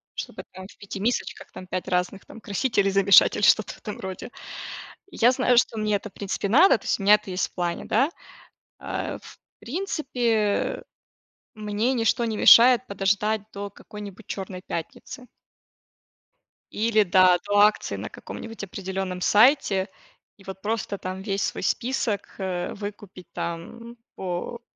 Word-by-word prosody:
чтобы, -, -, -6 dB
там, 185 Hz, 0 st, -10 dB
в -, -, -18 dB
5 200 Hz, -1 st, -8 dB
мисочках, 235 Hz, +5 st, -2 dB
там, 185 Hz, -, -10 dB
5 185 Hz, 0 st, -4 dB
разных, 180 Hz, +2 st, -1 dB
там, 225 Hz, -, -13 dB
красителей, 205 Hz, -1 st, 0 dB
замешать 195 Hz, 0 st, +6 dB
или -, -, -3 dB
что-то -, -, +4 dB
в -, -, -18 dB
этом 210 Hz, -, -8 dB
роде. 190 Hz, +6 st, -7 dB, 0.8 s
Я 240 Hz, -7 st, +3 dB
знаю, 250 Hz, -1 st, +2 dB
что 235 Hz, -1 st, +3 dB
мне 210 Hz, -1 st, +1 dB
это 205 Hz, +1 st, -4 dB
в -, -, -45 dB
принципе 200 Hz, 0 st, -3 dB
надо, 320 Hz, -, +6 dB
то -, -, -19 dB
есть -, -, 0 dB
у -, -, -5 dB
меня 205 Hz, +2 st, +8 dB
это 210 Hz, -2 st, -6 dB
есть 185 Hz, +1 st, -1 dB
в -, -, -29 dB
плане, 175 Hz, -1 st, -2 dB
да. 270 Hz, +9 st, +2 dB, 0.7 s
Э, -, -, -4 dB
в -, -, -14 dB, 0.2 s
принципе 245 Hz, -, -1 dB, 0.7 s
мне 215 Hz, +3 st, -1 dB
ничто 235 Hz, -1 st, +1 dB
не 220 Hz, -2 st, -2 dB
мешает 245 Hz, +1 st, +7 dB
подождать 200 Hz, +2 st, 0 dB
до 200 Hz, 0 st, -6 dB
какой-нибудь 205 Hz, 0 st, -11 dB
чёрной 190 Hz, -2 st, -6 dB
пятницы. 210 Hz, +9 st, -7 dB, 1.5 s
Или 215 Hz, 0 st, +2 dB
да 185 Hz, -1 st, +5 dB
до 205 Hz, 0 st, +2 dB
акции 210 Hz, +1 st, +3 dB
на -, -, -6 dB
каком-нибудь 225 Hz, -2 st, -9 dB
определённом 190 Hz, -1 st, -5 dB
сайте 210 Hz, -3 st, +4 dB, 0.5 s
и, 195 Hz, -, -18 dB
вот, 190 Hz, 0 st, -9 dB
просто, 210 Hz, -2 st, -2 dB
там, 185 Hz, 0 st, -6 dB
весь 200 Hz, 0 st, -2 dB
свой -, -, -3 dB
список, 240 Hz, -4 st, -2 dB
э, 185 Hz, -2 st, -3 dB
выкупить, 205 Hz, -3 st, -9 dB
там, 230 Hz, +8 st, -6 dB, 0.2 s
по 185 Hz, +6 st, -5 dB
205 Hz, 155 wpm, -25 LUFS, 190-230 Hz, 1.5 s, меня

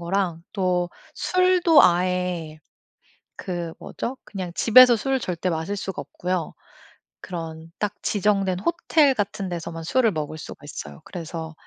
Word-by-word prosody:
거랑 175 Hz, -1 st, -1 dB
또 180 Hz, -3 st, 0 dB, 0.2 s
술도 365 Hz, -4 st, +4 dB
아예 180 Hz, -3 st, +1 dB, 0.8 s
그 175 Hz, -3 st, -4 dB
뭐죠? 260 Hz, +2 st, -5 dB
그냥 185 Hz, -4 st, -6 dB
집에서 245 Hz, +1 st, +7 dB
술 270 Hz, +4 st, 0 dB
절대 180 Hz, -5 st, -2 dB
마실 165 Hz, +4 st, -2 dB
수가 190 Hz, -1 st, -4 dB
없고요. 180 Hz, -2 st, -3 dB, 0.7 s
그런 165 Hz, -2 st, -7 dB
딱 210 Hz, -1 st, -1 dB
지정된 195 Hz, -3 st, +1 dB
호텔 310 Hz, -, +3 dB
같은 200 Hz, -4 st, -2 dB
데서만 165 Hz, -1 st, -5 dB
술을 230 Hz, +5 st, +2 dB
먹을 155 Hz, -1 st, -4 dB
수가 -, -, -9 dB
있어요. 75 Hz, -, -8 dB
그래서 165 Hz, -2 st, -6 dB
180 Hz, 255 characters per minute, -24 LUFS, 165-210 Hz, 0.8 s, 집에서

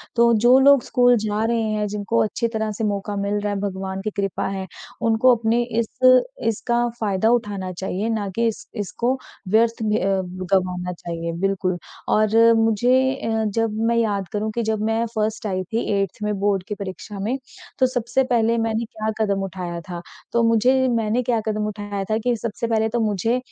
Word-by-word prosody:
तो 235 Hz, 0 st, +5 dB
जो 255 Hz, +2 st, +8 dB
लोग 280 Hz, -2 st, +6 dB
स्कूल 245 Hz, -1 st, +4 dB
जा 210 Hz, 0 st, -1 dB
रहे 230 Hz, 0 st, +1 dB
हैं, 210 Hz, -1 st, -1 dB
जिनको 200 Hz, -, 0 dB
अच्छी 230 Hz, -, -1 dB
तरह 220 Hz, -1 st, -2 dB
से 215 Hz, +2 st, -5 dB
मौका 205 Hz, 0 st, -2 dB
मिल 205 Hz, +1 st, 0 dB
रहा 205 Hz, 0 st, -2 dB
है, 200 Hz, -, -2 dB
भगवान 190 Hz, -1 st, -4 dB
की 215 Hz, -, -2 dB
कृपा 195 Hz, -2 st, -1 dB
है। 195 Hz, -1 st, -4 dB, 0.4 s
उनको 230 Hz, +2 st, +4 dB
अपने 230 Hz, +1 st, +1 dB, 0.2 s
इस 230 Hz, -, +1 dB, 0.6 s
इसका 235 Hz, +2 st, 0 dB
फ़ायदा 210 Hz, 0 st, +1 dB
उठाना 200 Hz, -6 st, -1 dB
चाहिए, 190 Hz, +4 st, -3 dB
ना 210 Hz, -3 st, -1 dB
कि 230 Hz, 0 st, +2 dB
इस 220 Hz, -2 st, -4 dB
इसको 235 Hz, +5 st, -1 dB, 0.3 s
व्यर्थ 225 Hz, +3 st, +2 dB
में 210 Hz, 0 st, +1 dB
अ, 195 Hz, 0 st, +1 dB
ग 185 Hz, 0 st, -7 dB
गंवाना 180 Hz, -1 st, -1 dB
चाहिए, 170 Hz, -1 st, -5 dB
बिल्कुल। 190 Hz, -2 st, 0 dB, 0.3 s
और 225 Hz, +2 st, +5 dB
मुझे 245 Hz, +4 st, +3 dB
अ, 225 Hz, -3 st, -1 dB
जब 225 Hz, -1 st, +1 dB
मैं 235 Hz, -, +2 dB
याद 205 Hz, -5 st, 0 dB
करूँ 215 Hz, +1 st, -1 dB
कि 235 Hz, -, 0 dB
जब 220 Hz, -1 st, -1 dB
मैं 225 Hz, +1 st, +1 dB
फर्स्ट 215 Hz, 0 st, -1 dB
आई 185 Hz, -2 st, -1 dB
थी 230 Hz, -, +1 dB
8th 195 Hz, -2 st, -1 dB
में 210 Hz, 0 st, 0 dB
बोर्ड 200 Hz, -2 st, +1 dB
की 210 Hz, -, -3 dB
परीक्षा 200 Hz, +1 st, -7 dB
में। 230 Hz, +7 st, -1 dB, 0.4 s
तो 260 Hz, -, +5 dB
सबसे 250 Hz, +1 st, 0 dB
पहले 235 Hz, -2 st, +2 dB
मैंने 225 Hz, 0 st, 0 dB
क्या 220 Hz, 0 st, -4 dB
कदम 200 Hz, -3 st, +1 dB
उठाया 180 Hz, -2 st, -5 dB
था। 175 Hz, -1 st, -5 dB, 0.3 s
तो 235 Hz, 0 st, +2 dB
मुझे 230 Hz, +3 st, +4 dB, 0.2 s
मैंने 230 Hz, +1 st, +1 dB
क्या 230 Hz, -1 st, +1 dB
कदम 215 Hz, -1 st, -1 dB
उठाया 205 Hz, -1 st, -4 dB
था 215 Hz, -, +2 dB
कि 245 Hz, -1 st, +2 dB
सबसे 230 Hz, +1 st, -3 dB
पहले 220 Hz, -1 st, +1 dB
तो 235 Hz, +1 st, -1 dB
मुझे 220 Hz, +2 st, +1 dB
215 Hz, 195 wpm, -22 LUFS, 195-230 Hz, 0.6 s, जो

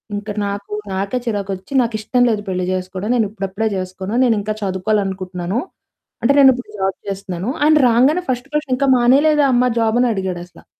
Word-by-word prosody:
ఇంక 205 Hz, +1 st, -6 dB, 0.2 s
నాకు 200 Hz, +1 st, -5 dB, 0.2 s
నాకే 195 Hz, +6 st, -2 dB
చిరాకొచ్చి 200 Hz, 0 st, -4 dB
నాకిష్టం 230 Hz, +2 st, -1 dB
లేదు 215 Hz, -2 st, 0 dB
పెళ్లి 185 Hz, -1 st, -1 dB
జేసుకోవడం 185 Hz, +4 st, -3 dB
నేనిప్పుడప్పుడే 210 Hz, -1 st, -1 dB
జేసుకోను, 185 Hz, +2 st, -5 dB
నేనింకా 215 Hz, -3 st, +1 dB
చదువుకోవాలనుకుటున్నాను, 190 Hz, 0 st, -2 dB, 0.6 s
అంటే 275 Hz, +4 st, +4 dB
నేనిప్పుడు 260 Hz, -2 st, +4 dB
జాబ్ 190 Hz, 0 st, 0 dB
చేస్తున్నాను. 195 Hz, +1 st, -4 dB
ఆయన 310 Hz, +1 st, +5 dB
రాంగానే 265 Hz, +10 st, +3 dB
ఫస్ట్ 250 Hz, +1 st, -2 dB
క్వెషన్ 300 Hz, -3 st, -1 dB
"ఇంకా 275 Hz, 0 st, +1 dB
మానేయలేదా 285 Hz, +5 st, +4 dB
అమ్మ 250 Hz, +1 st, +3 dB
జాబని" 235 Hz, +2 st, +2 dB
అడిగాడసల. 180 Hz, -2 st, -6 dB
210 Hz, 140 wpm, -18 LUFS, 190-245 Hz, 0.6 s, ఆయన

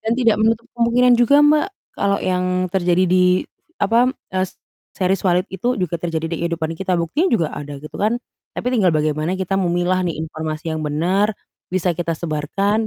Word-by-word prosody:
Dan, 225 Hz, +1 st, -1 dB
tidak 230 Hz, -4 st, +3 dB
menutup 225 Hz, +1 st, +2 dB
kemungkinan 245 Hz, +1 st, +3 dB
juga 285 Hz, +5 st, +6 dB
Mbak 300 Hz, +1 st, +4 dB, 0.3 s
kalau 200 Hz, 0 st, +1 dB
yang 185 Hz, -1 st, -1 dB
terjadi 180 Hz, -1 st, +2 dB
di 180 Hz, 0 st, +3 dB, 0.3 s
apa, 230 Hz, +5 st, +3 dB
m -, -, +1 dB, 0.2 s
eee, 185 Hz, 0 st, 0 dB, 0.5 s
series 190 Hz, 0 st, +1 dB
Walid 180 Hz, +1 st, +2 dB
itu 240 Hz, +7 st, -1 dB
juga 175 Hz, -3 st, -2 dB
terjadi 165 Hz, -2 st, -2 dB
di 165 Hz, 0 st, -2 dB
kehidupan 165 Hz, -1 st, -2 dB
kita, 185 Hz, +1 st, -1 dB
buktinya 265 Hz, -, 0 dB
juga 165 Hz, -3 st, 0 dB
ada, 145 Hz, -1 st, -6 dB
gitu, 150 Hz, +2 st, -11 dB
kan, 215 Hz, +4 st, +2 dB, 0.4 s
tapi 250 Hz, -, -1 dB
tinggal 210 Hz, -7 st, +3 dB
bagaimana 155 Hz, +4 st, 0 dB
kita 190 Hz, +1 st, -1 dB
memilah 175 Hz, +1 st, +1 dB
nih 175 Hz, -3 st, -2 dB
informasi 160 Hz, +1 st, -5 dB
yang 160 Hz, -, -3 dB
bener, 180 Hz, +8 st, 0 dB, 0.3 s
bisa 180 Hz, -1 st, 0 dB
kita 165 Hz, 0 st, -2 dB
sebarkan, 185 Hz, +8 st, -1 dB
185 Hz, 175 wpm, -20 LUFS, 165-210 Hz, 0.5 s, juga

